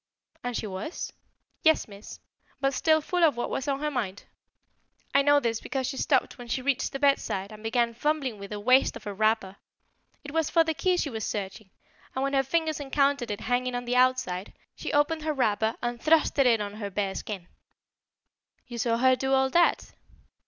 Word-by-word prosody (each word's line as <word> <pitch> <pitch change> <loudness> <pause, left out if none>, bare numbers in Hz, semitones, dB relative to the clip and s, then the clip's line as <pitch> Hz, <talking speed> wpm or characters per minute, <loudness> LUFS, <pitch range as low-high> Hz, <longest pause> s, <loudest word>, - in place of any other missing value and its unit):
"And 245 -1 -2
she - - -3
was?" 195 - -5 0.5
"Yes, 315 0 +4
Miss; 200 0 -11 0.4
but 275 0 +1
still 315 +3 +3
full 355 +3 0
of 300 -7 +4
what 240 - -2
was 265 - -3
on 275 0 -1
her 300 0 -1
mind. 205 -7 -3 0.9
I 275 - +6
know 290 +1 +5
this 230 -4 -1
because 265 -1 -3
she 265 +1 -4
stopped 265 -3 +1
when 245 - -9
she 240 - -1
reached 275 -1 0
the - - -3
bedside 275 -8 +1
and 215 0 -11
began 235 +1 +1
fumbling 270 -3 -1
with 200 0 -8
the 210 - -5
waist 255 +5 +4
of - - -9
her 205 - -5
wrapper. 215 -2 0 0.7
It 285 - -8
was 320 0 0
for 330 - +4
the 320 0 -1
key 365 +3 +1
she 295 -5 -1
was 220 -2 -4
searching, 200 0 -4 0.5
and 260 - -1
when 275 0 -1
her 270 - +4
fingers 315 +3 -1
encountered 280 -3 +1
it 205 - -4
hanging 250 +1 0
on 245 0 -3
the 245 +1 -1
outside, 255 -7 +1 0.2
she - - -5
opened 295 +2 +2
her 310 0 -1
wrapper 220 -4 +1
and 240 -1 -3
thrust 315 -2 +3
it 270 - +6
in 230 -3 +4
on 205 0 -5
her 205 -2 -4
bare 195 0 -2
skin." 195 -3 -6 1.2
"You 240 -1 -7
saw 230 0 +1
her 260 +1 +4
do 265 +1 -1
all 265 0 +2
that?" 345 +2 +2
255 Hz, 205 wpm, -27 LUFS, 220-285 Hz, 1.2 s, I